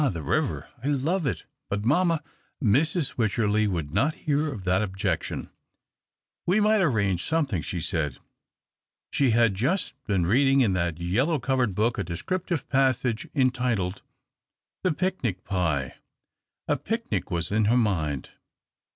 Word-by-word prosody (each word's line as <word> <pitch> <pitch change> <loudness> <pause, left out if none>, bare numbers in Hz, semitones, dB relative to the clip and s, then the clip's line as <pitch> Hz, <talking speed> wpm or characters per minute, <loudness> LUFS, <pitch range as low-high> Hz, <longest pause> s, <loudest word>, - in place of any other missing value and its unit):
the 85 -2 -5
river - - -1
— 120 - -25
I - - -2
love 145 +4 +1
it 95 -11 -2
— - - -57
but 100 +1 -2
mamma 165 +3 +2 0.2
" - - -43
Mrs. 145 - +1
Wycherley 110 -1 +2
would 80 -6 -3
not 140 - +2
hear 150 0 +1
of 105 -8 -7
that 90 +3 +2
obj 95 -2 -4
ection. - - -2 0.5
" - - -65
We 185 +5 +4
might 215 0 +4
arrange 100 - +1
something," 145 - 0
she 85 +4 -4
said. 75 -6 -1 0.9
She 135 -3 +2
had 115 -2 +4
just 135 - 0
been 95 -5 +1
reading 135 +7 +4
in 105 -7 +3
that 85 -2 -1
yellow 120 - +1
covered 125 -5 0
book 115 +4 +1
a - - 0
descriptive 170 - -3
passage 130 -4 +1
entitled, 125 -8 +1 0.4
" - - -65
The 185 - +3
Picnic 150 - -2
Pie." 80 -9 -1 0.7
A - - +2
picnic 230 +2 -3
was 85 -1 -2
in 105 +1 +2
her 115 +4 +4
mind. 80 - 0
115 Hz, 160 wpm, -26 LUFS, 95-145 Hz, 0.9 s, We